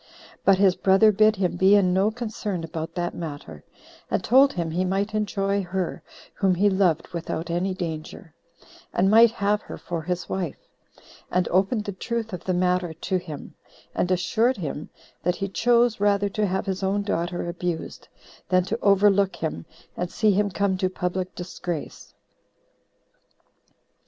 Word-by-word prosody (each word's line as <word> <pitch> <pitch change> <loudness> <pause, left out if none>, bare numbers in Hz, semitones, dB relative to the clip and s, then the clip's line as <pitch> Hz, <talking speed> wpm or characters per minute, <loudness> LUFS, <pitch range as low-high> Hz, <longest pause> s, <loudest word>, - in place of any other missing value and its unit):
But 195 -1 +5
his 190 -2 +4
brother 195 +3 +5
bid 215 +1 +4
him 185 -2 -1
be 190 +3 +6
in 185 -3 +3
no 195 +3 +3
concern 215 -5 -4
about 165 0 -5
that 175 0 -2
matter, 145 - -7 0.5
and - - 0
told 270 +3 +5
him 170 -2 -2
he 180 +3 0
might 195 +3 -1
enjoy 200 -1 0
her 185 -1 -3 0.3
whom 190 -2 +1
he 200 +3 +3
loved 180 -5 +1
without 170 -1 -4
any 185 +2 -1
danger, 160 -1 -6 0.6
and 190 +2 +3
might 230 +2 +8
have 210 -2 0
her - - -9
for 170 -2 -4
his 180 +2 -3
wife; 180 -6 -3 0.7
and 180 0 +1
opened 195 +5 +1
the 200 - -3
truth 225 +2 -4
of 180 - -6
the 185 - 0
matter 180 -1 +1
to 185 +3 -1
him, 155 -5 -8 0.4
and 180 - 0
assured 220 +7 +1
him 155 -3 -5 0.3
that 180 +1 0
he 195 - -3
chose 235 +3 +2
rather 205 0 +2
to 210 +1 0
have 190 +1 -1
his 190 -1 -3
own 195 +1 0
daughter 175 -3 -2
abused, 175 -1 -4 0.4
than 185 -1 +3
to 225 +5 -3
overlook 200 -1 +4
him, 160 - -4 0.3
and 180 0 -3
see 215 +2 +2
him 205 +1 +1
come 195 0 0
to 185 - +1
[public] 185 0 -3
disgrace. 175 -2 -6
190 Hz, 160 wpm, -24 LUFS, 175-205 Hz, 0.7 s, might